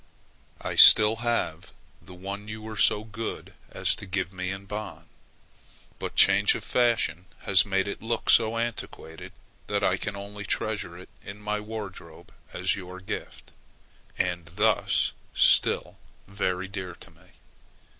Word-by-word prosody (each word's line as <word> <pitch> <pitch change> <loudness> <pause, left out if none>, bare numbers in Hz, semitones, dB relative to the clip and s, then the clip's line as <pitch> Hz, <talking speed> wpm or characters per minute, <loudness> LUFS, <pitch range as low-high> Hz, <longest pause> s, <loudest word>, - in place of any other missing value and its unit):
I - - -4
still 105 +1 +8
have 115 -9 -2 0.3
the 90 - -13
one 100 +3 -7
you 110 +1 -7
were 110 0 -7
so 105 +1 +3
good 110 +1 -7 0.2
as - - +3
to 100 - -8
give 95 0 -3
me 90 0 -4
in 95 +1 -6
Bonn; 105 +2 -7 0.9
but - - -5
change 100 +1 +5
of - - -6
fashion 115 -8 +1 0.2
has 95 0 +3
made 95 0 0
it 100 - -5
look 115 +1 -3
so 115 0 +5
antiquated, 115 -8 -6 0.4
that 105 -1 -1
I 95 - +2
can 100 +1 -5
only 100 +1 -8
treasure 100 -3 -3
it 90 - -13
in 100 +1 -9
my 105 0 -3
wardrobe 105 -6 -9 0.2
as - - 0
your 95 -1 -9
gift, 95 - -8 0.7
and 85 -2 -2
thus 105 +4 +1 0.2
still - - +3 0.3
very 95 -1 -2
dear 95 -3 -7
to - - -15
me. - - -24
100 Hz, 145 wpm, -26 LUFS, 95-110 Hz, 0.9 s, still